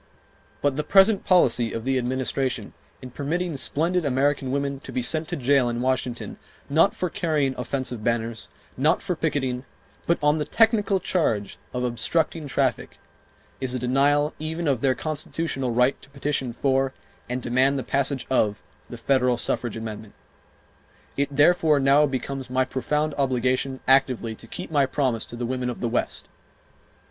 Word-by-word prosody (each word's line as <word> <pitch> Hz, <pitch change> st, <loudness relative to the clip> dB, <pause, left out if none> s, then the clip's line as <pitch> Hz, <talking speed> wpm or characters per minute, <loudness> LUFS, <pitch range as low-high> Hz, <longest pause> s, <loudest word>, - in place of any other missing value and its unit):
But 145 Hz, -1 st, +1 dB
the 150 Hz, -, 0 dB
present 195 Hz, +5 st, +4 dB
policy 125 Hz, -10 st, +3 dB
of 115 Hz, 0 st, -4 dB
the 135 Hz, -1 st, +1 dB
Administration, 130 Hz, +1 st, -2 dB, 0.3 s
in 130 Hz, -, -8 dB
permitting 160 Hz, +5 st, -2 dB
splendid 165 Hz, +6 st, +1 dB
American 135 Hz, 0 st, +1 dB
women 140 Hz, 0 st, -2 dB
to 135 Hz, -, -9 dB
be 130 Hz, -1 st, -2 dB
sent 155 Hz, +5 st, 0 dB
to -, -, -3 dB
jail 135 Hz, -1 st, +2 dB
in 120 Hz, 0 st, -3 dB
Washington, 125 Hz, -1 st, -2 dB, 0.3 s
not 165 Hz, +7 st, +4 dB
for 180 Hz, -, -1 dB
carrying 155 Hz, -8 st, 0 dB
offensive 125 Hz, -2 st, -3 dB
banners, 115 Hz, -1 st, -2 dB, 0.3 s
not 150 Hz, +6 st, +2 dB
for 180 Hz, -3 st, -1 dB
picketing, 130 Hz, -6 st, -1 dB, 0.4 s
but 170 Hz, -, +3 dB
on 150 Hz, +1 st, +3 dB
the -, -, 0 dB
technical 210 Hz, +1 st, +2 dB
charge 115 Hz, -, -1 dB
of 125 Hz, 0 st, -3 dB
obstructing 145 Hz, +6 st, -1 dB
traffic, -, -, -1 dB, 0.6 s
is 130 Hz, -1 st, -2 dB
a -, -, 0 dB
denial 140 Hz, +4 st, +2 dB
even 160 Hz, +2 st, -3 dB
of 135 Hz, -5 st, +1 dB
their 130 Hz, -2 st, +2 dB
constitutional 155 Hz, -3 st, -3 dB
right 125 Hz, +3 st, +2 dB
to -, -, -15 dB
petition 140 Hz, -2 st, -2 dB
for, 135 Hz, +1 st, 0 dB, 0.3 s
and 125 Hz, +1 st, -3 dB
demand 130 Hz, +3 st, +2 dB
the 130 Hz, -, -3 dB
passage 140 Hz, -1 st, 0 dB
of, 105 Hz, -5 st, +1 dB, 0.3 s
the 120 Hz, -, -7 dB
federal 125 Hz, 0 st, +2 dB
suffrage 120 Hz, -1 st, -2 dB
amendment. 110 Hz, -1 st, -7 dB, 1.0 s
It, 140 Hz, 0 st, +1 dB
therefore, 150 Hz, +1 st, +4 dB
now 140 Hz, +2 st, +4 dB
becomes 135 Hz, 0 st, -4 dB
my 130 Hz, 0 st, +1 dB
profound 150 Hz, +4 st, -1 dB
obligation 130 Hz, 0 st, 0 dB
actively 130 Hz, -4 st, +3 dB
to 115 Hz, -, -13 dB
keep 180 Hz, +8 st, -7 dB
my 140 Hz, -3 st, +3 dB
promise 130 Hz, -5 st, -1 dB
to -, -, -8 dB
the 120 Hz, 0 st, -3 dB
women 125 Hz, 0 st, -2 dB
of 120 Hz, -, -5 dB
the 120 Hz, -, -1 dB
West. 120 Hz, -, -2 dB
135 Hz, 160 wpm, -24 LUFS, 125-150 Hz, 1.0 s, present